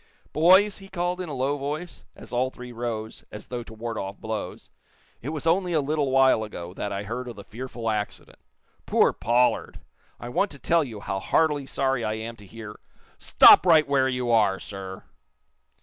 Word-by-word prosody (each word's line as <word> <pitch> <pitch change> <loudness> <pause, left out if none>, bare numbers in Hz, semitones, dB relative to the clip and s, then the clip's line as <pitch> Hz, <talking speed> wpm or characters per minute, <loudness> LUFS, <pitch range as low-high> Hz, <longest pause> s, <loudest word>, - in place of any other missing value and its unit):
"Boys," 190 +7 +5
he 195 - -12
called, 180 -1 -2
in 180 - -6
a - - -5
low 135 +3 -1
voice, 150 +5 -5
as - - -13
all 125 +2 +1
three 125 -1 -10
rose 115 -2 -5
as 105 - -10
though 125 -1 -4
to 115 - -12
ward 115 0 -5
off 95 +1 -6
blows, 110 -1 -6 0.5
"it 130 - -5
was 155 0 -5
only 175 0 +2
little 145 -1 0
while 130 -4 +4
ago 90 -5 -8
that 100 +1 -4
I 100 0 -3
heard 120 +4 -5
of 120 - -7
the 100 - -10
fearful 120 +1 -7
accident. 105 -2 -4 0.5
Poor - - +3
Pollard! 125 +1 +1 0.4
I 120 - -7
want 195 +11 +1
to 140 - -10
tell 165 +3 +2
you 110 -7 -8
how 95 - -3
heartily 145 +5 +1
sorry 135 -3 0
I 110 - -1
am 115 +1 -6
to 105 -2 -15
hear 110 0 -10 0.2
" - - -31
"Stop - - +7
right 160 -4 +5
where 135 -2 +2
you 125 -2 -1
are, 105 -4 +3
sir!" 95 -1 -8
125 Hz, 195 wpm, -25 LUFS, 110-150 Hz, 0.5 s, Stop